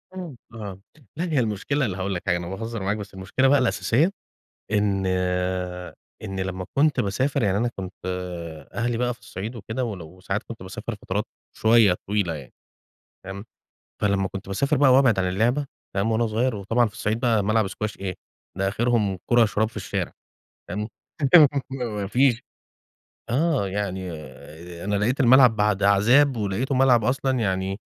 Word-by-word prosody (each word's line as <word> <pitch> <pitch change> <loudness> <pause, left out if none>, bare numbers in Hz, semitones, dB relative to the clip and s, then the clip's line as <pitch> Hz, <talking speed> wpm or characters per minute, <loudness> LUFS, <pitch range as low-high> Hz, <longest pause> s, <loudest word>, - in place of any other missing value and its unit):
امم، 170 -9 -7 0.2
آه، 100 -4 -7 0.4
لا 170 - -1
هي 155 -6 +1
المشكلة 115 +6 0
اللي 95 -5 -3
هاقول 95 0 -2
لك 85 - -3
حاجة 90 -1 +3
أنا 85 - -6
باهزر 115 0 -5
معاك، 100 +2 0
بس 100 -1 -8
المشكلة 95 +8 +1
بقى 145 +1 +5
الأساسية، 125 +6 +2 0.6
إن 100 -2 +1 1.2
إن 95 -1 -4
لمّا 95 -1 -3
كنت 150 -1 +4
باسافر 120 +7 0
يعني 100 -2 +2
أنا 120 +2 +1
كنت 95 0 -6 0.8
أهلي 120 0 -1
بقى 125 0 0
في 120 - -26
الصعيد 105 +4 -6
وكده 115 +3 -3
ولو 90 -5 -7
ساعات 95 +2 -2
كنت 115 -5 -9
باسافر 95 0 -6
فترات - - -1 0.3
شويّة 110 -5 +5
طويلة 100 -5 0
يعني، 70 -4 -9 0.7
فاهم؟ 100 +3 -7 0.6
فلما 100 -2 +2
كنت 95 0 -7
باسافر 140 +10 +1
بقى 135 -1 +5
وابعد 130 -7 +5
عن 95 - +1
اللعبة، 120 +10 +1 0.3
فاهم، 100 +3 +1
وأنا 115 +1 +2
صغيّر 115 +3 0
وطبعًا 115 +4 +1
في 105 - -7
الصعيد 110 +4 -2
بقى 115 -4 +2
ملعب 110 -1 +2
سكواش 110 +2 -5
إيه! 95 -2 -3 0.4
ده 95 0 +1
آخرهم 110 -3 +1
كرة 120 -1 +5
شراب 110 0 +1
في - - -19
الشارع. - - -3 0.6
تمام، 105 +4 -3 0.8
ما 130 -2 -3
ما 105 -3 -3
فيش 125 +1 +3 0.9
آه، 140 - +1
يعني 95 -2 -3 0.7
أنا 105 - -1
لقيت 120 +7 0
الملعب 125 -2 +7
بعد 105 -1 +1
عذاب، 120 +8 +5
ولقيته 110 +6 -1
ملعب 130 -4 +4
أصلًا 130 +1 +1
يعني 95 -1 -1
110 Hz, 165 wpm, -24 LUFS, 95-125 Hz, 1.2 s, الملعب